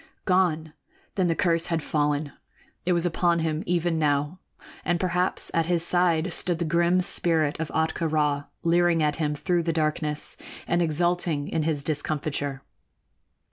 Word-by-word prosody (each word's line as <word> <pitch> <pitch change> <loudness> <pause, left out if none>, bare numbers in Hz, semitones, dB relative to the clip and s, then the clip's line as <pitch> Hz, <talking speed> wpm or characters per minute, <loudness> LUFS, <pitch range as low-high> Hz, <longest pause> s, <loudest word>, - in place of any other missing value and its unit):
Gone! 165 -4 +1 0.4
Then 185 -3 +1
the 165 - +1
curse 165 -1 +1
had 165 -3 -1
fallen. 150 -1 0 0.6
It 180 - +4
was 170 0 +1
upon 175 0 +1
him 160 -1 -1
even 170 -1 0
now, 145 +3 0 0.4
and 175 0 0
perhaps 180 0 0
at 165 -1 +1
his 170 -1 +2
side 175 -1 +2
stood 175 0 +2
the 170 - -2
grim 170 +3 +2
spirit 160 -4 +1
of 160 - -3
Ahtka 160 +1 -1
Rā, 150 -2 0 0.2
leering 170 -1 +3
at 150 -1 0
him 150 -2 -1
through 175 +3 0
the 165 0 -1
darkness 155 -1 -2 0.3
and 175 0 +1
exulting 170 -2 0
in 160 - -1
his 150 -2 -1
discomfiture. 145 -2 -2
165 Hz, 155 wpm, -25 LUFS, 150-175 Hz, 0.6 s, It